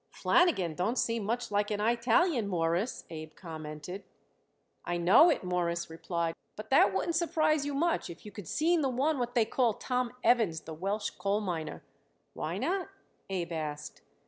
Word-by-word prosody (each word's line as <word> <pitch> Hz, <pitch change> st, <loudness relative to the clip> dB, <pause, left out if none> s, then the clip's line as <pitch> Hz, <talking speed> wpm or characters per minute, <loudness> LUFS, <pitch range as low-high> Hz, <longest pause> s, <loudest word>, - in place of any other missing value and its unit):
"Flanagan 255 Hz, -, +2 dB
don't 195 Hz, +10 st, -1 dB
seem 230 Hz, -2 st, 0 dB
much 235 Hz, +1 st, -2 dB
like 205 Hz, 0 st, +1 dB
an 210 Hz, -1 st, -1 dB
Eyetalian, 235 Hz, -, +2 dB
Mawruss," 175 Hz, +4 st, -1 dB
Abe 155 Hz, -1 st, -8 dB
commented. 160 Hz, +2 st, -7 dB, 0.8 s
"I 175 Hz, -, -2 dB
know 190 Hz, -, +7 dB
it," 310 Hz, -, +1 dB
Morris 175 Hz, -2 st, -1 dB
replied; 165 Hz, 0 st, -2 dB, 0.2 s
"but 215 Hz, +2 st, -9 dB
that 235 Hz, -6 st, +6 dB
wouldn't 190 Hz, -, -1 dB
surprise 310 Hz, -3 st, +1 dB
you 285 Hz, -, -3 dB
much 330 Hz, -, 0 dB
if 170 Hz, +3 st, -10 dB
you 210 Hz, -, -8 dB
could 205 Hz, -6 st, -9 dB
seen 330 Hz, -, +2 dB
the 270 Hz, -, +1 dB
one 275 Hz, +4 st, +1 dB
what 245 Hz, 0 st, -2 dB
they 230 Hz, -2 st, +4 dB
call 230 Hz, -1 st, +1 dB
Tom 250 Hz, -1 st, -1 dB
Evans, 215 Hz, -10 st, +3 dB
the 160 Hz, -, -8 dB
Welsh 200 Hz, +6 st, -2 dB
coal 200 Hz, +1 st, -1 dB
miner." 170 Hz, -7 st, -4 dB, 0.5 s
"Why -, -, -3 dB
not?" 380 Hz, +1 st, -1 dB, 0.4 s
Abe 175 Hz, -3 st, -3 dB
asked. 150 Hz, -2 st, -5 dB
205 Hz, 170 wpm, -30 LUFS, 170-255 Hz, 0.8 s, know